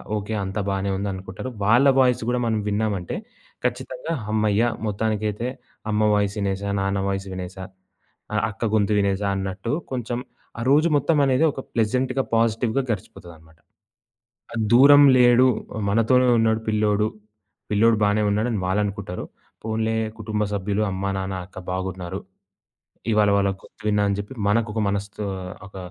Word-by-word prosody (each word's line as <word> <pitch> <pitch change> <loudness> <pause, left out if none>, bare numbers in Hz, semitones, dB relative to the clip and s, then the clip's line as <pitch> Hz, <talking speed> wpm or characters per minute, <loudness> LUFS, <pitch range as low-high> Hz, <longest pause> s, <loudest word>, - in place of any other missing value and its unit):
Okay 105 +1 -3
అంత 95 +2 -5
బాగానే 100 0 -1
ఉంది 100 +1 -2
అనుకుంటారు. 95 +6 -7 0.2
వాళ్ళ 120 +6 +5
వాయిస్ 125 -2 +3
గూడా 125 0 +1
మనం 110 -2 0
విన్నామంటే 105 -3 -1 0.5
ఖచ్చితంగా 165 - -3 0.2
హమ్మయ్య! 110 0 +2 0.2
మొత్తానికైతే 110 +1 -1 0.4
అమ్మ 105 0 +1
వాయిస్ 100 -1 +1
ఇనేసా. 100 0 -2
నాన్న 95 0 0
వాయిస్ 95 0 -2
వినేసా. 95 +1 -6 0.7
ఆహ్, 105 - +1
అక్క 105 +2 -8
గొంతు 105 0 +2
వినేసా 100 0 0
అన్నట్టు 95 +3 -3 0.2
కొంచెం 120 -1 -3 0.4
ఆ - - -3
రోజు 150 +4 +5
మొత్తం 150 +3 +1
అనేది 130 +2 +2
ఒక 135 - -8
ప్లెజెంట్‌‌గా, 125 +4 +1
పాజిటివ్‌గా 115 +2 +1
గడిచిపోతదన్నమాట. 80 -5 -8 1.0
ఆ - - -5 0.2
దూరం 145 +4 +8 0.2
లేడు. 120 +1 +6 0.3
ఆహ్, 110 - -3
మనతోనే 115 +4 +3
ఉన్నాడు 110 0 +2
పిల్లోడు. 105 -1 +2 0.6
పిల్లోడు 110 +2 +4
బానే 105 +1 +2
ఉన్నాడని 110 +1 0
వాళ్ళనుకుంటారు. 100 -1 -2 0.4
పోన్లే 110 0 -1 0.2
కుటుంబ 105 -1 -1
సభ్యులు 100 +1 -1
అమ్మ, 95 +1 -4 0.2
నాన్న, 95 0 -3
అక్క 95 - -18
బాగున్నారు. 95 0 -4 0.9
ఇవాళ 105 -1 +4
వాళ్ళ 100 -1 +2
గొంతు - - -18
విన్నానని 105 -1 +2
జెప్పి 105 +6 -8
మనకు 110 +1 +2
ఒక 110 - 0
మనసుతో 100 +1 -3 0.4
ఒక 100 - -14
105 Hz, 140 wpm, -23 LUFS, 100-115 Hz, 1.0 s, దూరం